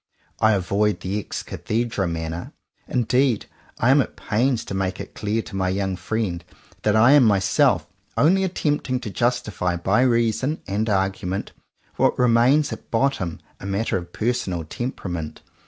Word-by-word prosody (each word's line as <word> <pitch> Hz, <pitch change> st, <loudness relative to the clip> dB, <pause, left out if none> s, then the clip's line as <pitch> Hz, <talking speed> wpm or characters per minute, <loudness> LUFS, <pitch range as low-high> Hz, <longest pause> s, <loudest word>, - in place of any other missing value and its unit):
I 110 Hz, 0 st, +4 dB
avoid 100 Hz, +2 st, +1 dB
the 100 Hz, +3 st, -2 dB
ex 105 Hz, -, -5 dB
cathedra 110 Hz, -4 st, -2 dB
manner. 80 Hz, +1 st, -4 dB, 0.3 s
Indeed 125 Hz, -1 st, +1 dB, 0.3 s
I 125 Hz, -, +3 dB
am 140 Hz, +1 st, +6 dB
at -, -, -5 dB
pains 120 Hz, +3 st, 0 dB
to -, -, -6 dB
make 95 Hz, -1 st, -2 dB
it -, -, -8 dB
clear 110 Hz, +2 st, -1 dB
to 100 Hz, -, -9 dB
my 95 Hz, -1 st, 0 dB
young 95 Hz, 0 st, -1 dB
friend 90 Hz, -2 st, -2 dB, 0.4 s
that 105 Hz, -1 st, +2 dB
I 115 Hz, +4 st, +6 dB
am 145 Hz, -2 st, +7 dB
myself 105 Hz, -, +3 dB, 0.3 s
only 190 Hz, +6 st, +4 dB
attempting 145 Hz, -8 st, -1 dB
to 105 Hz, -, -5 dB
justify 105 Hz, -4 st, 0 dB
by 95 Hz, +7 st, +2 dB
reason 120 Hz, +4 st, +1 dB
and 105 Hz, +3 st, -1 dB
argument 95 Hz, -1 st, -1 dB, 0.5 s
what -, -, +2 dB
re 125 Hz, -1 st, +3 dB
mains 125 Hz, +6 st, +4 dB
at -, -, -11 dB
bottom 115 Hz, -, 0 dB, 0.2 s
a 95 Hz, -, -7 dB
matter 100 Hz, +3 st, -1 dB
of 85 Hz, -1 st, -4 dB
personal 100 Hz, -7 st, -1 dB
temperament. 85 Hz, -5 st, -5 dB
105 Hz, 155 wpm, -23 LUFS, 95-125 Hz, 0.5 s, am